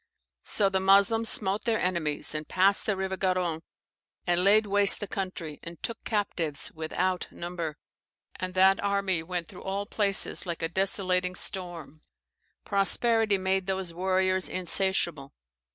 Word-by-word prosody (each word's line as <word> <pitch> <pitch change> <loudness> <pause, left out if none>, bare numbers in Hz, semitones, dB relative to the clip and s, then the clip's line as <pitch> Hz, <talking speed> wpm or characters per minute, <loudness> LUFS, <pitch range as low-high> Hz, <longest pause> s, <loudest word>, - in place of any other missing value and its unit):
So 205 - +2
the 190 -1 0
Moslems 200 +4 +4
smote 200 +1 +1
their 230 -2 +1
enemies, 170 -6 0
and 155 0 -5
passed 195 +2 +2
the 205 -3 0
river 190 0 -3
Garonne, 180 -4 -1 0.6
and 175 0 +1
laid 210 +3 +5
waste 205 -1 +3
the 205 - -4
country, 180 -7 -6
and 170 0 -9
took 230 - -5
captives 175 -8 -2
without 180 +3 -2
number. 170 -3 -6 0.6
And 185 0 -5
that 190 +1 +4
army 200 -4 0
went 175 0 -4
through 180 - -12
all 195 +1 -3
places 200 -2 0
like 170 -1 -4
a 165 - -1
desolating 185 0 0
storm. 175 -5 0 0.6
Prosperity 215 +2 +2
made 190 0 -1
those 190 -3 -3
warriors 185 +1 +1
insatiable. 175 -5 +1
190 Hz, 140 wpm, -27 LUFS, 175-200 Hz, 0.6 s, laid